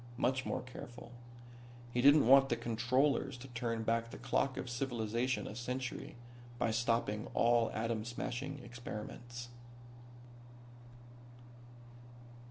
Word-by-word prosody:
Much 130 0 +1
more - - -2
careful. 120 -1 -10 0.8
He 125 - +2
didn't 145 +1 +7
want 135 +2 +7
the - - +2
Controllers 130 +4 +1
to 125 +2 -10
turn 115 -2 -2
back 115 +1 0
the - - -8
clock 135 -1 0
of - - -4
civilization 120 0 -1
a 105 - -6
century 125 +1 -4 0.4
by 115 -1 +1
stopping 115 -2 0
all 115 -1 +4
atom 110 0 -1
smashing 125 +4 -4
experiments. 120 0 -7
120 Hz, 110 wpm, -35 LUFS, 115-130 Hz, 0.8 s, didn't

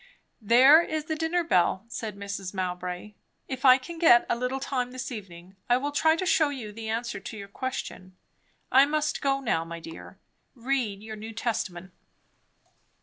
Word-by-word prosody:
"There 255 +9 +7
is 315 -2 -3
the 315 - -2
dinner 325 +2 0
bell," 190 - +1
said 220 -3 -6
Mrs. 200 -1 -6
Mowbray. 180 +2 -4 0.3
"If 265 0 -5
I 255 -1 +9
can 330 +5 -9
get 280 -8 +6
a - - +2
little 250 +2 -2
time 255 -2 -2
this 255 +1 -6
evening, 190 -4 -10
I 245 - +5
will 285 +3 -3
try 315 +2 +3
to 370 - -3
shew 320 -4 +3
you 250 -7 -6
the 220 +1 -7
answer 230 0 -3
to 215 +3 -8
your 200 -1 -8
question. 200 -5 -6 0.5
I 270 +2 +6
must 300 0 -1
go 275 -1 +1
now, 220 -10 0
my 170 0 -8
dear. 165 0 -11 0.4
Read 235 -5 -2
your 220 0 -7
New 220 +2 -8
Testament." 190 -6 -3
235 Hz, 175 wpm, -27 LUFS, 200-275 Hz, 0.5 s, I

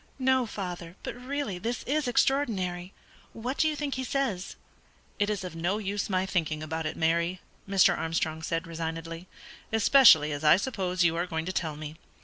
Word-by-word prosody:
"No, 260 -2 +2
father; 180 -4 -6
but - - -4
really 250 -6 -4
this 235 +5 -3
is 295 +1 0
extraordinary. 195 -9 0 0.4
What 245 +5 -4
do 315 - +4
you 310 - 0
think 290 -2 -3
he 260 - -3
says?" 245 -9 -2 0.6
"It 205 0 +2
is 205 -3 -2
of 180 -3 -6
no 175 +5 0
use 205 0 -3
my 185 -1 +1
thinking 155 -5 -1
about 160 0 -3
it, - - -5
Mary," 170 +2 +1 0.3
Mr. 195 -2 +5
Armstrong 160 0 -2
said, 165 0 -2
resignedly, 165 +1 -5 0.4
"especially 225 - +6
as 145 +1 -4
I 150 +3 +7
suppose 190 -5 -1
you 165 -1 +3
are 175 +2 -1
going 160 -2 -3
to 185 - -3
tell 160 -5 -2
me. 155 +1 -8
185 Hz, 180 wpm, -28 LUFS, 165-235 Hz, 0.6 s, I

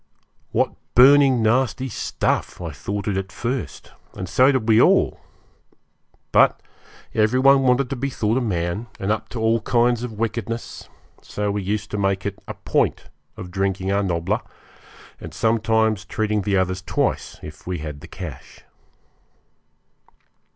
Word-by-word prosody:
What - - +1 0.2
burning 135 -1 +6
nasty 130 +3 +1
stuff 120 - -2
I 85 -3 -5
thought 100 +7 -5
it 100 -2 0
at 95 0 -4
first; 125 +2 -4 0.2
and 95 - -5
so 130 +9 +4
did 130 -5 -1
we 110 0 +6
all! - - +3 1.1
But - - +4 0.5
every 110 +4 +2
one 135 +1 +6
wanted 130 0 +2
to - - -1
be 135 +2 -2
thought 115 -1 0
a - - -3
man, 90 0 -2
and 95 +2 -1
up 110 - -2
to 120 - -6
all 115 0 +2
kinds 120 +1 +2
of 120 -2 -5
wickedness, 115 +1 -4 0.3
so 105 0 -3
we 100 0 -2
used 105 +2 -3
to 105 - -2
make 95 -1 0
it 100 -1 -4
a - - -6
point - - -1 0.3
of 90 -1 -8
drinking 95 0 -1
our 100 +1 +2
nobbler, 85 -4 -1 0.8
and - - -9
sometimes 110 -2 +1
treating 105 -1 -1
the 100 0 0
others 95 0 0
twice, - - -2
if 75 +2 -11
we 90 -1 -2
had 75 -2 -8
cash. - - -9
110 Hz, 150 wpm, -22 LUFS, 95-120 Hz, 1.1 s, burning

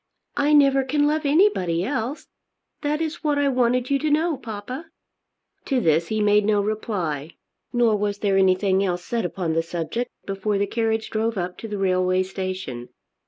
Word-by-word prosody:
"I 290 +1 +2
never 275 -2 +5
can 290 +2 +1
love 300 0 +1
anybody 280 - +3
else. 255 +4 -3 0.6
That 300 +1 -1
is 325 +1 -3
what 295 -2 +1
I 285 -1 +2
wanted 250 0 +1
you 275 - +3
to 310 - 0
know, 315 +2 +2
papa." 250 +5 -7 0.8
To 270 -3 +1
this 165 -5 +2
he 215 -1 0
made 210 0 +4
no 210 0 +2
reply, 185 -8 -2 0.4
nor 240 -3 +3
was 205 0 -1
there 200 -1 +1
anything 190 0 +3
else 180 -2 -2
said 235 -4 -1
upon 175 -2 -2
the 165 - +2
subject 170 +8 -3 0.2
before 195 +1 -1
the 200 - +1
carriage 225 0 -1
drove 225 0 -1
up 180 0 -3
to 225 - -6
the 210 -1 -4
railway 185 -1 +2
station. 185 -10 -5
215 Hz, 175 wpm, -23 LUFS, 185-270 Hz, 0.8 s, never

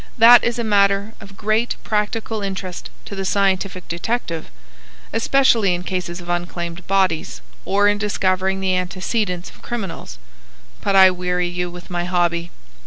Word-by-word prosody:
That 235 +1 +8
is 235 0 0
a 235 - -1
matter 200 0 +2
of 195 -2 -13
great 220 +3 0
practical 215 +1 -2
interest 190 -2 -5 0.2
to - - -8
the 195 -1 -3
scientific 190 -1 0
detective,—especially 170 - -1
in 175 - -5
cases 180 -2 -4
of 175 - -11
unclaimed 175 0 -4
bodies, 185 - +1 0.3
or 205 +1 +3
in 205 0 +2
discovering 190 -2 0
the 190 -1 +1
antecedents 185 0 -2
of - - -19
criminals. 190 - -6 0.7
But 200 - +1
I 190 -1 +8
weary 180 -1 -1
you 175 0 -3
with 175 +1 -11
my 175 0 -2
hobby." 175 -1 0
190 Hz, 145 wpm, -20 LUFS, 175-205 Hz, 0.7 s, That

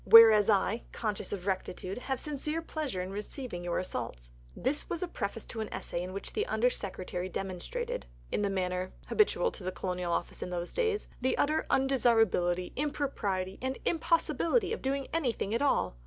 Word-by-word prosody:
Whereas 225 -2 +10
I, 215 +2 +3
conscious 215 -3 -3
of 190 -3 -4
rectitude, 190 +1 -2
have 265 0 -2
sincere 300 +2 -2
pleasure 290 - -3
in 185 - -6
receiving 210 -1 -5
your 175 -1 -1
assaults." - - -4 0.2
This 280 +4 0
was 340 +1 -1
a - - -1
preface 220 -8 -4
to 225 - -5
an 215 - -4
essay 170 - -3
in 180 +1 -4
which 195 +1 -5
the - - 0
Under 225 +3 +3
Secretary 185 -3 -4
demonstrated, 475 - -4 0.2
in - - +1
the 200 - +2
manner 185 -1 -1 0.2
habitual 460 +2 +3
to 195 - -10
the 185 - -1
Colonial 180 -2 -2
Office - - -2
in - - -3
those 175 -1 -3
days, 445 -4 0
the 260 +1 +2
utter 305 +2 +2
undesirability, 225 -9 +3
impropriety, 235 -10 -1
and 260 +1 -1
impossibility 335 - +2
of - - -4
doing 275 +1 0
anything 245 -10 0
at 230 - +1
all. 95 - +2
225 Hz, 175 wpm, -31 LUFS, 185-285 Hz, 0.2 s, Whereas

